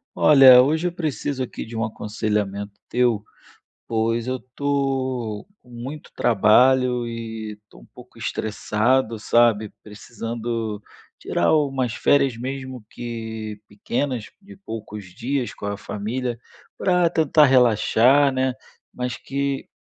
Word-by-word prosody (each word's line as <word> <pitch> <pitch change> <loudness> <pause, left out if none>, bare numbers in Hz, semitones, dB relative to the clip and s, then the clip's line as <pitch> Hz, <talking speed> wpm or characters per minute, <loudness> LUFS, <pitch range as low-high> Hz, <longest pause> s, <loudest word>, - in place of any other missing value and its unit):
Olha, 135 -4 +8
hoje 160 +6 +1
eu - - -2
preciso 145 -5 -3
aqui 125 - -5
de 115 - -11
um 110 - 0
aconselhamento 105 -2 -3 0.2
teu, 120 -4 +1 0.6
pois 115 +1 0
eu 130 - -1
estou 130 -4 -2 0.2
com 125 - -23
muito 125 +5 -8
trabalho 125 +3 +3
e 115 -2 -6
estou 105 - -19
um - - -16
pouco 125 -1 -15
estressado, 115 +2 0
sabe? 110 -1 +2
Precisando 115 0 -5 0.4
tirar 85 - +1
umas 135 -5 0
férias 140 -2 +2
mesmo 130 -1 -6
que 110 -3 -6
pequenas, 120 +3 -3 0.2
de 200 0 -14
poucos 110 - -8
dias 120 +8 -3
com 100 - -7
a 100 0 -3
família, 120 +5 -4 0.4
para 180 -2 +2
tentar 155 -2 +4
relaxar, 130 +2 +4
né. 130 0 0 0.4
Mas 125 -1 -3
que 140 0 -3
120 Hz, 120 wpm, -22 LUFS, 110-135 Hz, 0.6 s, Olha